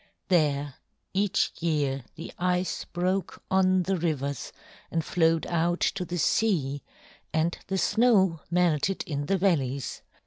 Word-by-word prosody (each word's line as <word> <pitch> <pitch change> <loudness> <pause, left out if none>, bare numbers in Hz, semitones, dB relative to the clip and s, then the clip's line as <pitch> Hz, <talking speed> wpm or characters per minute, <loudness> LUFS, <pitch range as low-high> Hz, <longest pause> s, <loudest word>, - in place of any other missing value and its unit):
There 145 -5 +2 0.4
each 195 0 +1
year 145 -5 0
the 165 - -8
ice 180 +1 0
broke 185 +1 -2
on 185 -1 +4
the 195 +2 0
rivers 140 -6 -2 0.4
and 165 -1 -1
flowed 165 -2 +2
out 175 +1 0
to 185 -2 0
the 175 +1 -4
sea, 150 -7 +1 0.5
and 160 +2 +1
the 190 - -1
snow 205 -6 +3
melted 175 +1 +1
in 145 -2 -3
the 195 - +2
valleys. 140 -9 0
170 Hz, 130 wpm, -27 LUFS, 150-185 Hz, 0.5 s, on